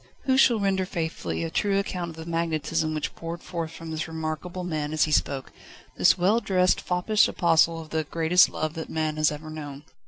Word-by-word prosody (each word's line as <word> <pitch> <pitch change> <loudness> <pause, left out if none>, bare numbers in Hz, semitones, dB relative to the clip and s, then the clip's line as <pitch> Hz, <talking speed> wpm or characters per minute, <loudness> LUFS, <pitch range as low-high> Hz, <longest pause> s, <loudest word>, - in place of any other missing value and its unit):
Who 260 - +2
shall 245 -4 +5
render 190 -2 0
faithfully 130 - -3
a 80 - -4
true 200 -1 +1
account 180 -3 -2
of 165 - -10
the 160 0 -8
magnetism 160 -1 -1
which 155 - -3
poured 165 +1 -7
forth 165 -2 -4
from 165 0 -9
this 160 0 -3
remarkable 160 +3 -4
man 155 -3 -3
as 155 - +3
he 155 - 0
spoke: 140 -2 0 0.4
this - - +4
well 195 +6 +3
dressed, 185 -4 +2
foppish 185 +4 +2
apostle 165 -1 +3
of 160 -1 -10
the 160 0 0
greatest 165 +3 +4
love 155 0 -3
that 165 -1 -6
man 155 -1 -2
has 155 0 +3
ever 155 +1 -7
known. 145 -2 -8
165 Hz, 205 wpm, -26 LUFS, 155-180 Hz, 0.4 s, shall